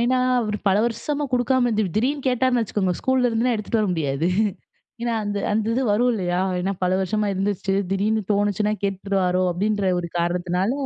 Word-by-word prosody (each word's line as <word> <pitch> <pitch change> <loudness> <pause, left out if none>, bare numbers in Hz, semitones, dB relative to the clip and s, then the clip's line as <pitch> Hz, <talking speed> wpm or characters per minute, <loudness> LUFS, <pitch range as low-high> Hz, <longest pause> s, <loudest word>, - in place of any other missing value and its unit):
ஏன்னா, 255 +2 +2 0.2
அவரு 210 -2 -2
பல 195 +2 +3
வருஷமா 290 +5 -2
கொடுக்காம 250 0 +2
இருந்து, 215 -1 +1
திடீர்ன்னு 270 +5 0
கேட்டாருன்னு 250 -1 +2
வச்சுக்கோங்க 190 -3 -1
ஸ்கூல்ல 260 -1 +2
இருந்துனா 230 +2 +1
எடுத்துட்டு 220 +1 -1
வர 210 - +1
முடியாது. 150 -1 -1 0.8
ஏன்னா, 235 -1 0
அந்த 205 0 -2
அந்த 215 0 0
இது 260 - +1
வரும் 245 +4 +3
இல்லயா 180 -3 -1 0.2
ஏன்னா 195 +2 -1
பல 180 - +1
வருஷமா 210 +2 0
இருந்துச்சு 195 0 -1 0.2
திடீர்னு 215 +3 +1
தோணுச்சுன்னா 205 +1 +1
கேட்டுருவாரோ 190 -2 0
அப்டின்ற 200 +1 0
ஒரு 170 - -5
காரணத்தினால 180 +4 0
210 Hz, 165 wpm, -23 LUFS, 190-235 Hz, 0.8 s, பல